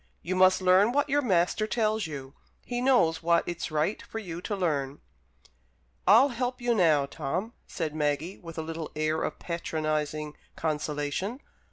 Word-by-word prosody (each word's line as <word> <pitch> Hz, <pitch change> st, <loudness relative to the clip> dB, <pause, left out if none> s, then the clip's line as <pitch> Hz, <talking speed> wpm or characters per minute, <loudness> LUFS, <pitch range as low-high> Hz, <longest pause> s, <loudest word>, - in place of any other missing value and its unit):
You 185 Hz, +2 st, -2 dB
must 185 Hz, 0 st, +5 dB
learn 185 Hz, +5 st, +5 dB
what 290 Hz, +1 st, +1 dB
your 290 Hz, +2 st, +3 dB
master 195 Hz, -2 st, +1 dB
tells 215 Hz, -3 st, 0 dB
you. 140 Hz, -3 st, -7 dB, 0.3 s
He 245 Hz, 0 st, -2 dB
knows 245 Hz, -12 st, +3 dB
what 170 Hz, 0 st, +2 dB
it's 175 Hz, -1 st, -3 dB
right 155 Hz, +6 st, 0 dB
for -, -, -8 dB
you 175 Hz, -6 st, -6 dB
to 205 Hz, -, -3 dB
learn." 145 Hz, -7 st, -1 dB, 1.1 s
"I'll 230 Hz, +9 st, +7 dB
help 250 Hz, 0 st, -2 dB
you 240 Hz, -1 st, +1 dB
now, 160 Hz, -9 st, +4 dB
Tom," 180 Hz, +11 st, -4 dB
said 160 Hz, -4 st, -3 dB
Maggie, 150 Hz, +4 st, -1 dB
with 165 Hz, -2 st, -10 dB
a 160 Hz, -, -2 dB
little 160 Hz, 0 st, -5 dB
air 155 Hz, +1 st, 0 dB
of -, -, -3 dB
patronizing 155 Hz, -3 st, -3 dB, 0.2 s
consolation. 150 Hz, -, -2 dB
170 Hz, 160 wpm, -28 LUFS, 155-215 Hz, 1.1 s, I'll